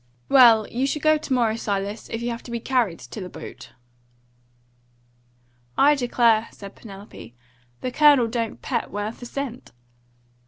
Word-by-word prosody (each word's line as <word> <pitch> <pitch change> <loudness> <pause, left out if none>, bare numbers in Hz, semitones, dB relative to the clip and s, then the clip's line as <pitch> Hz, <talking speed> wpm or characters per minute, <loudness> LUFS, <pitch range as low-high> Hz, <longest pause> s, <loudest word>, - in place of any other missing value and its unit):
"Well, 230 -5 +6
you 260 +3 -1
shall 300 - -2
go 310 0 +3
to 295 - -9
morrow, 235 -4 +2
Silas, 205 -1 -4
if 225 +1 -4
you 240 - -1
have 235 - -6
to - - -10
be 235 0 -3
carried 235 -8 0
to 215 - -9
the 180 - -7
boat." - - -10 2.1
"I 290 +2 +6
declare," 240 -4 +2
said 200 -1 -11
Penelope, 195 - -12 0.5
"the 255 - -3
Colonel 290 -4 +5
don't 230 -1 -4
pet 240 -4 -2
worth 205 +3 -5
a 245 - -7
cent." 260 -2 -6
235 Hz, 155 wpm, -23 LUFS, 215-255 Hz, 2.1 s, Well